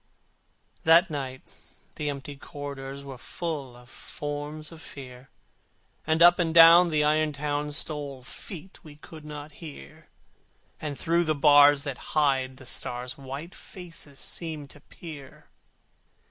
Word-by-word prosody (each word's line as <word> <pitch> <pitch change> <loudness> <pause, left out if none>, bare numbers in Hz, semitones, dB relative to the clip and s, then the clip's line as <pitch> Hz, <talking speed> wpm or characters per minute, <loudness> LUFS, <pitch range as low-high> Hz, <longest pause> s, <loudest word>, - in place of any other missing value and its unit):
That 165 +2 +6
night 130 -3 -6 0.4
the 150 -1 -2
empty 140 0 -6
corridors 140 -1 -7
Were 135 -3 -9
full 145 -8 -5
of 120 0 -16
forms 145 +3 -6
of 165 -1 -11
Fear, 130 -3 -10 0.8
And 160 +1 +4
up 175 +1 +7
and 165 -2 0
down 170 +1 +9
the 155 -2 +2
iron 155 0 +2
town 145 +1 -2
Stole 145 -3 -4
feet 180 +6 -9
we 150 -3 -12
could 155 +1 -12
not 150 0 -8
hear, 140 - -11 0.7
And 145 -3 -4
through 170 +1 +2
the 155 -1 +1
bars 145 0 +7
that 140 -4 -5 0.2
hide 135 -3 +2
the 130 - -13
stars 125 0 -3
White 140 +5 -7
faces 165 -6 -9
seemed 155 -4 -4
to 145 - -14
peer. 145 -4 -12
145 Hz, 135 wpm, -27 LUFS, 135-160 Hz, 0.8 s, down